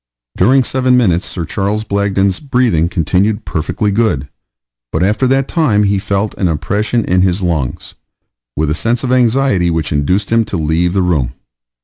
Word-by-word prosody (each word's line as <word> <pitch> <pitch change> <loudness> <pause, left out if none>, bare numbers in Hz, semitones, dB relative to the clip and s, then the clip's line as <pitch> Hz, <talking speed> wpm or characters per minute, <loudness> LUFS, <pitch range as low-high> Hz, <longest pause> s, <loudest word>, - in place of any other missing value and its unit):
During 130 +2 +3
seven 130 0 +1
minutes 90 -8 +2
Sir 85 - -4
C. 105 +2 -2
Blagden's 100 -2 0
breathing 120 - +1
continued 95 +6 0
perfectly 95 +6 -2
good, 100 - 0 0.6
but 80 - 0
after 105 +6 +1
that 135 +1 +1
time 130 -12 +1
he 100 -1 +1
felt 100 +2 -2
an 95 - +1
oppression 105 +8 -1
in 90 0 +2
his 95 +1 +1
lungs, 80 -8 -3 0.6
with 75 0 0
a - - +2
sense 115 - -1
of 125 - -1
anxiety, 125 -7 +2
which 80 -2 -2
induced 90 +9 0
him 115 0 +3
to 100 - -4
leave 80 +3 0
the 95 -2 +1
room. 70 -9 0
100 Hz, 165 wpm, -15 LUFS, 85-115 Hz, 0.6 s, During